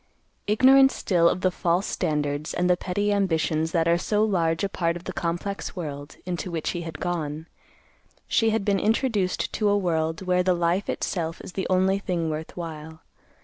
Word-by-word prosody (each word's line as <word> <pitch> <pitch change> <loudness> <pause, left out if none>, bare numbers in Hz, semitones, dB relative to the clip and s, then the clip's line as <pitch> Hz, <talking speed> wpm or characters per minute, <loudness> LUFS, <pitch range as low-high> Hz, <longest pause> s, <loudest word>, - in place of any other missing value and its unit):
Ignorant 265 +5 +6
still 170 -3 +2
of 185 - -2
the 185 - +2
false 175 +1 0
standards 150 -3 -2
and 180 - +1
the 180 - +4
petty 205 +3 -1
ambitions 160 -4 0
that 165 -2 +1
are 170 +1 +3
so 210 +3 +1
large 170 -5 +1
a - - +2
part 170 -3 -1
of 175 - -12
the 185 - -5
complex 175 +4 -3
world, 145 -4 -6
into 180 0 -3
which 165 -3 -2
he 175 - -4
had 165 -3 -7
gone, 160 -3 -3 0.8
she 225 -2 +2
had 220 -2 0
been 200 -1 +2
introduced 215 -4 0
to 210 -2 +1
a 205 - +3
world 165 -2 -1
where 180 -1 +2
the 180 0 +2
life 175 +3 0
itself 165 -2 -2
is - - -10
the 190 - -2
only 190 +1 +2
thing 170 -5 -2
worth 155 +3 -6
while. 160 -2 -7
175 Hz, 190 wpm, -25 LUFS, 165-195 Hz, 0.8 s, Ignorant